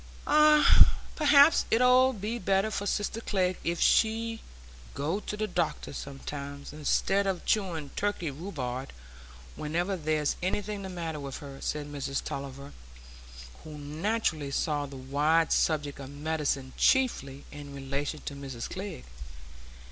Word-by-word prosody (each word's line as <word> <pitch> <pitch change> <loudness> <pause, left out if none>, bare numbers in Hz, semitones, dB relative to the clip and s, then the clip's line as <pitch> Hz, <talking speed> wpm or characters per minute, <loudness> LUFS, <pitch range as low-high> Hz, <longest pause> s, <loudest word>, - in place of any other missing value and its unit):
"Ah, 300 0 +6 0.2
perhaps 295 0 +6
it 225 - +3
'ud 250 -1 +5
be 220 +4 -3
better 195 +2 +1
for 200 -1 -2
sister 205 +2 -1
Glegg 185 -2 0
if 170 0 -1
she'd 225 0 +2 0.6
go 160 +8 -1
to 210 - -5
the 215 - 0
doctor 175 -8 -2
sometimes, 140 +1 -7
instead 195 +6 +1
o' 190 -2 0
chewing 170 -9 0
Turkey 200 -6 -1
rhubarb 135 -5 -5 0.7
whenever 175 +6 -1
there's 155 -3 0
anything 205 +3 -2
the 190 - -6
matter 165 -4 -4
with 140 -2 -6
her," 140 -1 -10
said 150 -1 -2
Mrs 140 -1 -3
Tulliver, 140 +1 -6 0.9
who 155 -1 -9
naturally 155 +1 -1
saw 145 +1 -1
the 135 -1 -9
wide 150 +5 +2
subject 145 -3 +1
of 135 -1 -7
medicine 145 -2 -2
chiefly 145 - +2
in 145 -1 -9
relation 140 +2 -3
to - - -6
Mrs 135 -4 -6
Glegg. 65 - -6
155 Hz, 135 wpm, -29 LUFS, 140-200 Hz, 0.9 s, Ah